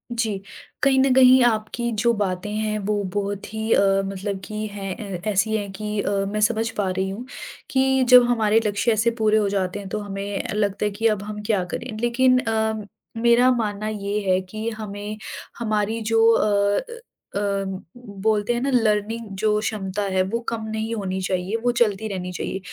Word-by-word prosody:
जी, 220 -4 -1 0.4
कहीं 270 -1 +4
न 265 0 +4
कहीं 260 0 +7
आपकी 235 +1 0
जो 235 0 +4
बातें 200 -2 -2
हैं 215 0 -1
वो 210 -1 +1
बहुत 200 -1 -2
ही 220 +1 -3
अ, 195 0 +4
मतलब 195 0 -4
की 215 0 -4
हैं 195 -2 -5 0.2
अ, - - -15
ऐसी 215 +2 +1
हैं 200 -2 -5
कि 210 +2 -4
अ, - - -2 0.2
मैं 215 - -1
समझ 220 +2 +2
पा 195 -2 +1
रही 190 +1 -1
हूँ 210 +6 -6 0.4
कि 265 0 +3
जब 250 -1 +9
हमारे 220 -2 +3
लक्ष्य 205 +3 +1
ऐसे 225 +2 +2
पूरे 215 0 +4
हो 210 -2 +2
जाते 195 -1 -1
हैं। 200 - -7
तो 210 - -2
हमें 200 -1 -4
अ, - - -4
लगता 205 -1 0
है 210 - 0
कि 220 +3 +1
अब 210 -3 0
हम 210 0 -6
क्या 205 -4 +1
करें? 250 - -4
लेकिन 255 +2 +3
अम, 220 -2 -1 0.4
मेरा 240 +2 +5
मानना 215 -3 -1
ये 205 -1 -2
है 185 0 +4
कि 215 +4 -5
हमें 205 0 -6 0.4
हमारी 215 0 -1
जो 225 0 +5
अ 205 -2 +2 0.5
अ, - - +1 0.8
बोलते 215 +1 +2
हैं 240 - -2
ना 275 - 0
लर्निंग 220 -1 +1
जो 210 0 +2
क्षमता 205 -2 -3
है 190 - +3
वो 230 - 0
कम 230 -1 -4
नहीं 220 +1 -3
होनी 190 -3 -3
चाहिए, 185 +2 -1
वो 245 - +3
चलती 220 -3 +1
रहनी 185 -3 -4
चाहिए। 185 +1 -4
215 Hz, 190 wpm, -23 LUFS, 200-225 Hz, 0.8 s, जब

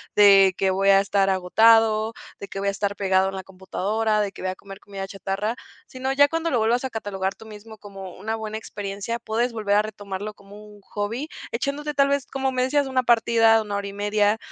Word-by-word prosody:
de 195 -2 +7
que 195 - +1
voy 195 +1 0
a 195 0 +6
estar 200 0 +1
agotado 220 +4 +4 0.3
de 200 - -7
que 195 - -6
voy 200 0 0
a - - +1
estar 200 0 -2
pegado 190 -1 +2
en 195 - -7
la 190 - -6
computadora 210 +3 -1
de 205 -1 -2
que - - -12
voy 185 - -2
a - - -7
comer 195 0 -12
comida 195 -2 -7
chatarra", 195 +3 -3 0.3
sino 260 +1 -4
ya 285 +1 +5
cuando 330 +2 -2
lo 250 - +1
vuelvas 230 +3 +1
a - - -2
catalogar 195 -4 -3
tú 220 - -14
mismo 220 0 -12
como 195 -3 -10
una 220 +1 -3
buena 220 -1 -5
experiencia, 205 +1 -5
puedes 235 +2 -1
volver 210 -2 0
a 210 - +5
retomarlo 205 -1 -6
como 200 +1 -14
un 210 -1 -15
hobby 215 +8 -4 0.2
echándote 285 +5 -3
tal 280 -1 +3
vez 280 -2 0
como 270 0 -2
me 255 - 0
decías 280 +1 +1
una 260 -1 0
partida, 225 -1 +4
una 205 -1 -5
hora 200 0 -3
y - - -6
media 205 +1 +1
210 Hz, 225 wpm, -23 LUFS, 195-230 Hz, 0.3 s, de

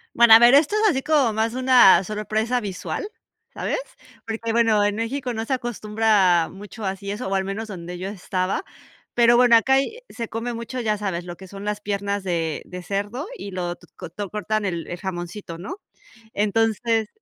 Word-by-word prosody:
Bueno, 235 -1 +7
a 225 - +11
ver, 240 +3 +7
esto 305 +8 +4
es 430 0 +4
así 270 -7 0
como 290 -7 +3
más 220 +1 0
una 255 -7 +6
sorpresa 215 +4 -1
visual, 205 - -4 0.5
¿sabes? - - -2 0.5
Porque, 225 0 -3
bueno, 225 -2 +3
en 205 0 +1
México 245 +2 -3
no 225 0 -3
se 265 - -1
acostumbra 215 -7 +2
mucho 205 +3 -10
así 195 0 -4
eso, 205 0 -4
o 195 - 0
al 190 0 0
menos 210 +3 -5
donde 180 -2 -7
yo 185 +2 -4
estaba, 185 - -2 0.5
pero 240 0 +5
bueno, 245 -1 +6
acá 245 +4 +4
hay 275 - 0
se 230 -1 -5
come 230 +2 -4
mucho, 235 +2 -5
ya 215 -2 0
sabes, 190 -4 -3
lo 175 -1 -8
que 190 - -12
son 195 +1 -9
las 210 0 -2
piernas 200 -1 -2
de 165 -4 -2
de 180 0 -8
cerdo 205 - -3
y 200 - -7
lo 175 -2 -3
tu - - -20 0.2
t 200 +4 -6
cortan 215 +1 -2
el 170 -4 -3
el 175 - -5
jamoncito, 175 -1 -6
¿no? 310 - -7 0.6
Entonces 225 +1 +1
210 Hz, 190 wpm, -23 LUFS, 190-235 Hz, 0.6 s, a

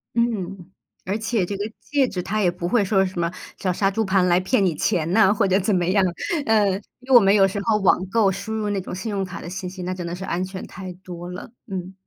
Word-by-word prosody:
嗯， 195 -6 -1 0.3
而 195 +3 -1
且 220 -3 0
这 200 - -4
个 205 +3 -4
戒 280 -3 +1
指 180 -5 -4
它 215 +1 -1
也 180 - +4
不 175 0 -4
会 215 +2 +3
说 195 -1 +2
什 185 -2 -5
么， 170 0 0 0.3
像 185 - -1
杀 195 +2 +1
猪 220 +3 0
盘 190 -2 +2
来 175 0 +4
骗 195 +2 +2
你 175 - +2
钱 170 0 0
呐， 205 -1 +5
或 205 -2 +2
者 190 +2 +3
怎 195 +1 +1
么 175 -1 +1
样， 195 +2 +3 0.4
呃， 215 -3 +4 0.3
因 255 +1 -17
为 - - +7
我 240 - +12
们 195 -1 +4
有 195 -1 +6
时 200 +1 -3
候 220 -1 +2
网 185 -2 +3
购 210 -2 +3
输 220 +4 -5
入 215 -1 -1
那 195 -2 -1
种 - - -7
信 210 +4 -4
用 195 -1 -1
卡 185 -1 -6
的 170 - -7
信 185 0 -5
息， 185 -1 -8
那 185 +1 -2
真 180 -2 -5
的 170 - -4
是 190 +1 -6
安 180 +1 -1
全 185 0 -6
太 185 0 -8
多 175 -1 -9
了， 180 +4 -8 0.2
嗯。 190 -1 -5
190 Hz, 290 characters per minute, -23 LUFS, 180-210 Hz, 0.4 s, 我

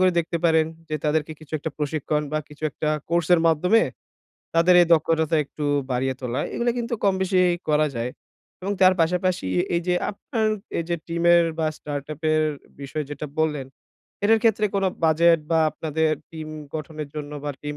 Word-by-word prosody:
করে 185 0 +5
দেখতে 170 0 -1
পারেন 160 -1 +4 0.2
যে 155 - -2
তাদেরকে 155 +1 0
কিছু 155 0 -16
একটা 160 +2 -4
প্রশিক্ষণ 150 0 -1
বা 155 - +1
কিছু 150 +1 -15
একটা 155 - -3 0.2
কোর্স 170 -1 +1
এর 165 - +3
মাধ্যমে 180 +8 +4 0.7
তাদের 170 +2 +5
এই - - +2
দক্ষতাটা 160 0 +3
একটু 145 +1 -7 0.3
বাড়িয়ে 130 +1 0
তোলা। 125 0 -2
এগুলো 240 0 +1
কিন্তু 235 0 -2
কমবেশি 190 -1 +2 0.3
করা 150 0 +3
যায় 120 +2 -2 0.5
এবং 200 +2 -1
তার 185 0 +7
পাশাপাশি 180 - +1 0.3
এই 170 - +2
যে 180 - +2 0.2
আপনার 220 +2 -2 0.3
এই 165 - -1
যে 170 - 0
টিমের 170 0 +4
বা 160 - +1
স্টার্ট 145 -1 -5
আপের 155 +1 +1 0.4
বিষয় 145 +2 -4
যেটা 145 +1 -5
বল্লেন 150 -4 0 0.6
এটার 225 +1 +5
ক্ষেত্রে 215 -2 +3
কোনো 195 -1 +2 0.2
বাজেট 165 +1 +5
বা 165 - +4
আপনাদের 160 0 -1 0.2
টিম 160 -1 -7 0.3
গঠনের 155 -1 -5
জন্য 150 -1 -6
বা 145 - -1
টিম 150 0 -4
160 Hz, 170 wpm, -24 LUFS, 150-175 Hz, 0.7 s, তার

